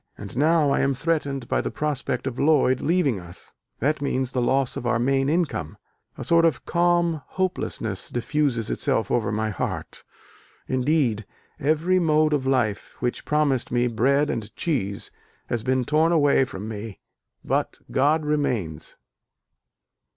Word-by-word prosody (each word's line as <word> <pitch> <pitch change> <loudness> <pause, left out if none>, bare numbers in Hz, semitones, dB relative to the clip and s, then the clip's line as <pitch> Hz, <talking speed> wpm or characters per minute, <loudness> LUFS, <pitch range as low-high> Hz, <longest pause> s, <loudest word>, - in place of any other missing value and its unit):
And 100 +1 -8
now 150 +1 +3
I - - +2
am 135 0 +1
threatened 140 -3 -1
by - - +1
the - - -3
prospect 140 -4 -2
of 130 -2 -4
Lloyd 140 -4 +3
leaving 150 - +1
us 85 0 -11 0.3
that 150 +4 +1
means 130 -2 -1
the 125 - 0
loss 130 +1 +1
of 120 - -4
our 120 -1 +2
main 135 +3 +1
income. 155 - -1 0.4
A - - -5
sort 170 0 +4
of 160 -6 +1
calm 170 -2 +2
hopelessness 120 - -2
diffuses 120 -1 -1
itself 110 - 0
over 120 -3 +1
my 110 +1 -1
heart. - - -4 0.6
Indeed, 130 -5 +1 0.3
every 160 +6 +2
mode 155 -2 +3
of 135 -3 0
life 120 -6 0
which 125 -1 -2
promised 150 -4 +1
me 120 0 +2
bread 135 +5 +2
and 110 -2 -5
cheese 100 - -2 0.4
has 120 - -1
been 130 +1 0
torn 155 +4 +3
away 145 -4 +4
from 105 -3 -7
me: 110 -1 -7 0.5
but - - -1
God 150 +3 +2
remains." 120 - -2
135 Hz, 150 wpm, -24 LUFS, 120-155 Hz, 0.6 s, sort